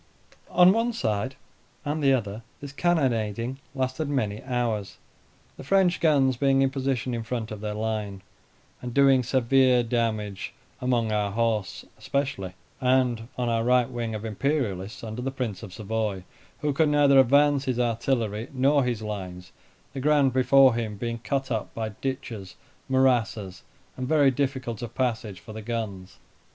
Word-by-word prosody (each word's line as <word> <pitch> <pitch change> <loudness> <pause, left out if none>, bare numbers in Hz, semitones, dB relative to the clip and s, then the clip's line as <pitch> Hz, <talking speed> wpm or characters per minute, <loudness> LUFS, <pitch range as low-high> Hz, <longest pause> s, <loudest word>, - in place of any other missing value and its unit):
On 180 0 +6
one 230 +2 0
side 110 - -2 0.5
and 150 +2 -2
the 140 -1 +4
other 110 -4 -1 0.2
this 140 -1 -8
cannonading 130 - 0 0.2
lasted 130 +3 -2
many 110 -7 -1
hours. 120 -6 -2 0.6
The - - -9
French 180 +4 +3
guns 135 -6 +3
being 135 0 +3
in 135 - +1
position 130 -2 -2
in 115 - -2
front 115 -1 -4
of 105 -1 -6
their 105 -1 -3
line, 105 -3 -3 0.6
and 125 -1 -6
doing 135 -2 +5
severe 130 0 +3
damage 110 -4 -2 0.2
among 120 -3 0
our 105 -1 0
horse 110 -2 -1
especially, 130 -10 -2 0.3
and 125 -3 +1
on 125 -1 -1
our 115 -1 +1
right 125 0 +3
wing 115 -2 -3
of 105 +1 -6
Imperialists 110 -4 -2
under 110 +2 -5
the 135 - -2
Prince 125 -7 -4
of 105 -5 -9
Savoy, 105 -1 -3 0.4
who 150 -1 0
could 155 +2 +3
neither 145 -2 +5
advance 140 +2 +4
his 125 -2 -1
artillery 115 -2 -1
nor 140 +2 +3
his 120 -3 -2
lines, 95 -4 -6 0.4
the 135 - -5
ground 145 -2 +3
before 130 0 +5
him 110 -3 -3
being 115 +2 -3
cut 135 +3 -2
up 110 -3 -3
by 110 -1 -2
ditches, 110 -4 -5 0.3
morasses, 115 -7 +1 0.3
and 130 0 -4
very 145 -2 +4
difficult 130 -4 -2
of 120 - -7
passage 110 -6 -2
for 85 +6 -11
the 110 - -7
guns. 105 -5 -5
120 Hz, 155 wpm, -26 LUFS, 110-135 Hz, 0.6 s, On